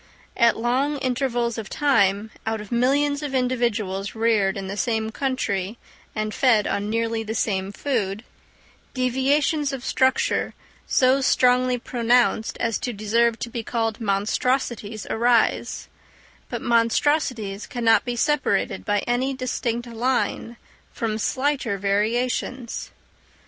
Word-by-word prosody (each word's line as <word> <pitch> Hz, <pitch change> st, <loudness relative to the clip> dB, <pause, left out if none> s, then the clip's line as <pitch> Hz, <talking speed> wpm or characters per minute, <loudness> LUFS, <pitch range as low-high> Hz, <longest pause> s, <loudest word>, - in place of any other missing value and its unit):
At 235 Hz, -2 st, +4 dB
long 260 Hz, +6 st, 0 dB
intervals 245 Hz, -3 st, -1 dB
of 215 Hz, -, -7 dB
time, 220 Hz, -7 st, +2 dB, 0.2 s
out 220 Hz, 0 st, -1 dB
of 210 Hz, -1 st, -10 dB
millions 285 Hz, +4 st, +2 dB
of 285 Hz, -3 st, -3 dB
individuals 230 Hz, -7 st, -1 dB
reared 220 Hz, -4 st, +2 dB
in 195 Hz, -, -4 dB
the 195 Hz, -, -4 dB
same 220 Hz, +1 st, -1 dB
country 225 Hz, -6 st, -2 dB, 0.4 s
and 215 Hz, 0 st, -2 dB
fed 230 Hz, -6 st, +3 dB
on 200 Hz, +1 st, -1 dB
nearly 230 Hz, 0 st, -1 dB
the 220 Hz, 0 st, -4 dB
same 195 Hz, -2 st, -1 dB
food, 215 Hz, -4 st, -2 dB, 0.7 s
deviations 275 Hz, +4 st, +1 dB
of 265 Hz, -2 st, -6 dB
structure 260 Hz, 0 st, +1 dB, 0.3 s
so 260 Hz, +1 st, +3 dB
strongly 250 Hz, -1 st, +3 dB
pronounced 240 Hz, -1 st, +1 dB
as 230 Hz, -3 st, 0 dB
to 245 Hz, -, -3 dB
deserve 225 Hz, +2 st, +1 dB
to 240 Hz, -, -3 dB
be 235 Hz, -, -3 dB
called 225 Hz, 0 st, -2 dB
monstrosities 215 Hz, +1 st, -1 dB
arise; 235 Hz, 0 st, +1 dB, 0.6 s
but -, -, -4 dB
monstrosities 230 Hz, -3 st, +1 dB
cannot 230 Hz, -2 st, +3 dB
be 245 Hz, -1 st, -3 dB
separated 295 Hz, +4 st, 0 dB
by 205 Hz, -1 st, +1 dB
any 255 Hz, +3 st, -1 dB
distinct 245 Hz, -2 st, -2 dB
line 235 Hz, 0 st, -1 dB, 0.3 s
from 220 Hz, -1 st, -2 dB
slighter 260 Hz, -4 st, 0 dB
variations. 235 Hz, +5 st, -1 dB
235 Hz, 125 wpm, -23 LUFS, 215-255 Hz, 0.7 s, At